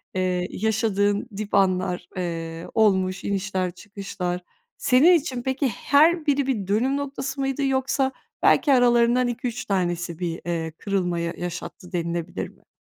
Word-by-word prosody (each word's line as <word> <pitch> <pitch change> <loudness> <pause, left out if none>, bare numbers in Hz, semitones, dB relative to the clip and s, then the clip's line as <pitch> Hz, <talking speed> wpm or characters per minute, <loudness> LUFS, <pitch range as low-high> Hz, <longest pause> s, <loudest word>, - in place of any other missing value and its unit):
eee, 180 -1 0
yaşadığın 210 0 0
dip 210 -1 -5
anlar, 185 -2 +1
eee, 165 -2 -4
olmuş, 190 -4 +2
inişler 190 -2 -1
çıkışlar. 180 -2 -5 0.4
Senin 290 +8 +5
için 265 -7 0
peki, 265 +1 0
her 315 +6 +3
biri 280 -2 +2
bir 210 -8 -1
dönüm 250 +7 +1
noktası 275 -1 -4
mıydı? 270 +1 -1
Yoksa 265 0 +1 0.3
belki 285 -3 +5
aralarından 245 0 +4
2-3 240 0 -3
tanesi 175 -3 -1
bir, 170 -2 -3
eee, 165 -2 -2
kırılma 180 -4 -1
yaşattı 175 +2 -5
denilebilir 170 0 -3
mi? - - -25
200 Hz, 130 wpm, -24 LUFS, 180-260 Hz, 0.4 s, Senin